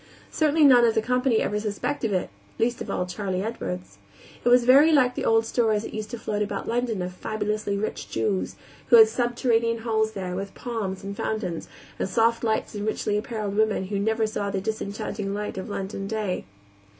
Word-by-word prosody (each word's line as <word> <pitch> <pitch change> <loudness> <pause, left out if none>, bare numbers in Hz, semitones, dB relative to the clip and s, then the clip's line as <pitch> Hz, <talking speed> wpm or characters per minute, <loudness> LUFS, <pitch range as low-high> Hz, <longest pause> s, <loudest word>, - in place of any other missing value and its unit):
Certainly 310 0 +3
none 255 -4 +7
of 230 -1 +3
the 220 - +3
company 250 -1 +2
ever 210 +1 0
suspected 215 +3 -2
it, 185 - -1 0.3
least 235 +1 0
of - - -5
all 180 - -1
Charley 185 0 -3
Edwards. 95 - -5 0.4
It 245 - +3
was 245 0 +6
very 275 +6 +7
like 255 -5 +4
the - - -3
old 225 0 +3
stories 225 -2 +1
that - - -7
used 215 -1 -5
to 235 - -5
float 210 -2 -3
about 210 - -3
London 230 -5 -1
of 180 0 -5
fabulously 210 +1 -2
rich 215 +2 -4
Jews, 195 -3 -1 0.3
who 240 - +6
had 220 -1 +9
subterranean 230 -1 0
halls 220 -1 +1
there, 185 -3 -4
with 195 +1 -5
palms, 210 -6 -4
and 200 0 -5
fountains, 205 -6 -3 0.3
and - - -1
soft 230 +3 +2
lamps 220 -1 0
and 205 0 -4
richly 210 -1 -1
appareled 210 -2 -3
women 210 -3 +1
who 200 -1 -1
never 220 +2 +1
saw 210 -2 -2
the 200 -1 -1
disenchanting 200 -1 -3
light 210 -2 -4
of 190 - -6
London 195 0 -4
day. 210 -4 -2
215 Hz, 195 wpm, -25 LUFS, 200-230 Hz, 0.4 s, had